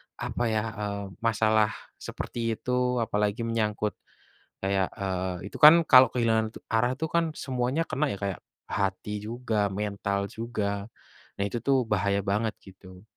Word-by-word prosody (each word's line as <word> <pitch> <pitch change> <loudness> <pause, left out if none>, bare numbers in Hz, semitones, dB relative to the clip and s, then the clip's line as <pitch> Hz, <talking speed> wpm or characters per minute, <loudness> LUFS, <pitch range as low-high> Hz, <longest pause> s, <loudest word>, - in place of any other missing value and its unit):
apa 120 - -3
ya, 110 -1 0 0.2
eee, 100 -1 -3
masalah 110 -1 +2 0.2
seperti 115 -1 -3
itu, 125 -1 0
apalagi 105 +2 -1
menyangkut 105 -2 0 0.7
kayak, 95 -1 +1
eee, 95 -2 -3
itu - - -6
kan 160 +2 +9
kalau 130 0 +8
kehilangan 110 -2 +1 0.2
arah 120 +3 +2
itu 160 - -1
kan, 170 -1 +2
semuanya 130 +5 -1
kena 145 0 -1
ya, 100 - -3
kayak, 100 -1 -4 0.3
hati 100 +1 -1
juga, 110 -2 -1
mental 100 0 -2
juga. 105 -3 -3 0.5
Nah 100 - 0
itu 120 +3 -3
tuh 135 +1 +3
bahaya 100 -1 +1
banget 105 +2 0
gitu. 95 0 -14
110 Hz, 140 wpm, -27 LUFS, 100-120 Hz, 0.7 s, kan